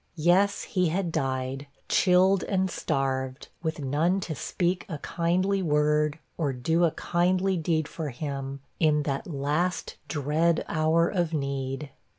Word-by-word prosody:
Yes, 185 +5 +3
he 180 -2 +1
had 175 +1 -1
died, 135 0 -2 0.2
chilled 185 +1 +4
and 190 -2 0
starved, 130 0 -2
with 160 -2 -2
none 155 +7 +1
to 170 - -3
speak 180 +5 -1
a 160 - -3
kindly 185 +5 0
word, 150 -1 +2 0.2
or 145 -4 0
do 160 +7 +2
a - - +4
kindly 185 +2 +1
deed 160 -2 0
for 160 -3 -5
him, 135 0 -5 0.2
in 150 -2 +3
that 140 -1 -2
last 155 +4 -1
dread 155 +3 +1
of - - -7
hour 160 +1 +2
of 175 -4 -1
need! 140 0 -3
160 Hz, 145 wpm, -27 LUFS, 140-175 Hz, 0.2 s, chilled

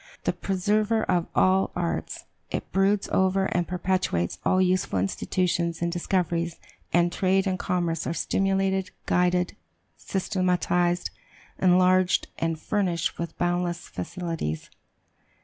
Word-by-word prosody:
The - - +1
"preserver 210 +3 +1
of 175 -2 +1
all 190 +1 +4
arts," 170 -1 -3 0.2
it - - -4
broods 195 +1 +2
over 190 0 +2
and 175 -2 0
perpetuates 180 - -1
all 185 - +3
useful 185 - +1
institutions 170 - 0
and 170 0 -1
discoveries; 170 -1 -1 0.4
and 175 0 +3
trade 190 +1 +2
and 185 -2 -1
commerce 170 -3 -1
are 165 - -1
stimulated, 195 0 0 0.2
guided, 180 0 +1 0.4
systematized, 180 -2 0 0.5
enlarged, 185 0 +4
and 165 -1 -1
furnished 175 -2 -1
with 170 -1 -5
boundless 175 0 -1
facilities. 125 - -4
180 Hz, 115 wpm, -26 LUFS, 170-190 Hz, 0.5 s, all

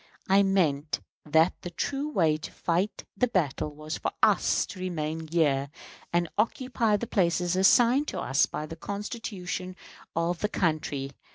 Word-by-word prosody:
I 195 +1 +5
meant 165 -7 +1 0.3
that 160 +3 +4
the 175 - -5
true 275 - -2
way 165 - +2
to 155 - -8
fight 180 +5 -1
the 250 +5 +2
battle 165 - 0
was 155 +1 -6
for - - -1
us - - +4
to 190 - -10
remain 160 -3 -3
here 145 -4 +1 0.4
and 175 0 +2
occupy 230 -1 +1
the 235 - -4
places 180 -5 +1
assigned 240 +9 +5
to - - -3
us 135 +3 +2
by 150 - -4
the 160 - -8
Constitution 200 -2 -5 0.4
of 165 +1 0
the 210 - 0
country. 155 -7 -1
175 Hz, 155 wpm, -28 LUFS, 155-205 Hz, 0.4 s, I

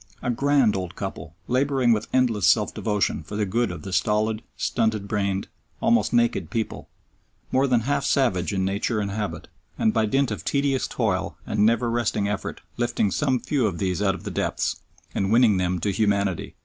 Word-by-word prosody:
A 125 - +1
grand 135 -2 +3
old 90 -2 -4
couple 80 - -6
labouring 130 -1 +2
with 110 -1 -2
endless 115 -7 +2
self 105 +4 +3
devotion 105 -3 0
for 105 - -8
the 105 0 0
good 115 +5 0
of 85 -4 -7
the 95 - -6
stolid, 110 +2 +1 0.2
stunted 110 -3 0
brained, 100 -2 -1 0.3
almost 235 +1 +2
naked 120 -8 +1
people, 110 +4 -4 0.6
more 135 +2 +3
than 125 -3 +3
half 140 +5 0
savage 110 -10 +1
in 95 -2 0
nature 100 +3 -1
and 100 -1 -2
habit, 105 0 -4 0.3
and 110 - +2
by 110 -1 +2
dint 135 +2 +1
of 105 - -4
tedious 140 -2 0
toil - - -1
and 105 0 +2
never 115 +1 +2
resting 115 -3 0
effort 105 - -4 0.2
lifting 120 -4 0
some 130 -4 +1
few 130 -1 0
of 90 -5 -3
these 95 0 -1
out 95 -2 +2
of 95 - -10
the - - -5
depths, - - -1 0.3
and 95 +1 0
winning 115 -4 +5
them 90 0 0
to 95 +4 -1
humanity. 100 -3 0
110 Hz, 190 wpm, -24 LUFS, 100-120 Hz, 0.6 s, winning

